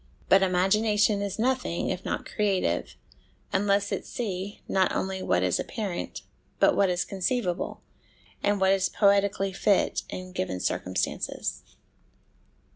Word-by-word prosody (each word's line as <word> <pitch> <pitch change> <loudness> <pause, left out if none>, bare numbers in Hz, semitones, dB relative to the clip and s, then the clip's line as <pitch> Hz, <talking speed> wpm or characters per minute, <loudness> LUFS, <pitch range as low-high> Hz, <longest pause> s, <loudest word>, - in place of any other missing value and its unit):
But 195 - +6
imagination 205 +3 +3
is 200 -2 -3
nothing 250 -7 0
if 180 - -4
not - - -3
creative, 190 - 0 0.6
unless 200 +1 +2
it - - -2
see, 205 -5 -5
not 190 -1 +2
only 190 0 -2
what - - +1
is - - +1
apparent, 200 -6 -4 0.4
but - - +5
what 195 -2 +3
is 180 0 0
conceivable, 190 -1 -2 0.6
and 205 0 +1
what 190 0 +4
is 195 -1 +2
poetically 200 -1 +2
fit 200 +1 +2
in 185 0 -7
given 95 - -3
circumstances. 90 0 -2
195 Hz, 125 wpm, -27 LUFS, 185-205 Hz, 0.6 s, But